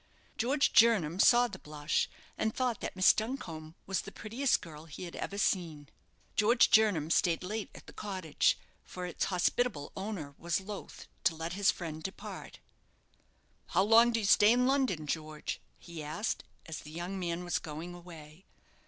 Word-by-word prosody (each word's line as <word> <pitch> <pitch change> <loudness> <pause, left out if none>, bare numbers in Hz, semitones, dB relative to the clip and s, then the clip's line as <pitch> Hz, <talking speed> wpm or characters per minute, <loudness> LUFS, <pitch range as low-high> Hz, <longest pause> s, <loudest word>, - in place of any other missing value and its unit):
George 275 +5 +1
Jernam 195 -8 +5
saw 245 +1 +6
the 190 -5 -9
blush, 150 +1 -1 0.3
and 220 0 -1
thought 250 -4 -1
that - - -4
Miss 185 0 +6
Duncombe 170 -10 -5
was 195 0 -1
the - - -10
prettiest 235 +5 0
girl 160 -4 -11
he 160 +3 -9
had 175 - -7
ever 200 - -4
seen. 165 -8 -1 0.5
George 235 +3 +4
Jernam 190 -8 +4
stayed 170 -1 +2
late 210 +3 -4
at - - -12
the - - -13
cottage, 185 -7 0 0.3
for 180 0 -7
its 175 - -2
hospitable 180 -3 0
owner 190 -8 -5
was 170 +2 0
loth 200 +1 -8 0.2
to 165 - +3
let 165 +2 -4
his 200 +1 +3
friend 160 -3 -3
depart. 190 +4 -7 1.1
"How 185 +2 +2
long 230 +3 +6
do 230 - +1
you 215 - -2
stay 205 +2 +6
in 250 +1 +3
London, 260 - +1
George?" 155 0 -4 0.2
he 170 -2 -9
asked, 155 +9 -3 0.2
as 160 -2 -6
the 150 - -11
young 175 +4 -5
man 175 -1 -2
was 175 -1 -1
going 160 +3 -7
away. 170 -1 -12
180 Hz, 170 wpm, -31 LUFS, 160-215 Hz, 1.1 s, saw